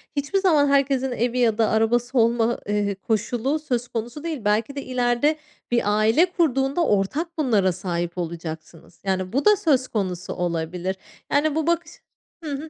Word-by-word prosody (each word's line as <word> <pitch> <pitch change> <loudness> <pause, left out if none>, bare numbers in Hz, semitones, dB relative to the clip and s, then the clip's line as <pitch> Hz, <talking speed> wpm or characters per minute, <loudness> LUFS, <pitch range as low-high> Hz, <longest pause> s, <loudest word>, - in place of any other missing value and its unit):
hiçbir 290 +8 0
zaman 310 -7 +4
herkesin 275 -2 +2
evi 245 +1 -1
ya 225 -3 +2
da 225 -2 +3
arabası 240 +3 +1
olma, 230 0 +2
eee, 205 -1 0
koşulu 235 +8 -1
söz 245 -5 -2
konusu 240 +7 -5
değil. 305 -10 -4
Belki 220 +6 +1
de 280 - -3
ileride 250 +3 +1 0.4
bir 240 - +3 0.2
aile 225 +11 +4
kurduğunda 305 -3 +1
ortak 305 - -1
bunlara 215 -10 +2
sahip 175 -1 -4
olacaksınız. 165 -1 -7
Yani, 185 0 -1
bu 275 +8 0
da 420 - +7
söz 275 -9 +1
konusu 185 -5 -3
olabilir. 175 +1 -2 0.4
Yani, 290 +1 +2
bu 320 0 -1
bakış 340 -2 0 0.5
Hı 300 - -4
hı. 290 +3 -5
240 Hz, 160 wpm, -23 LUFS, 200-285 Hz, 0.5 s, da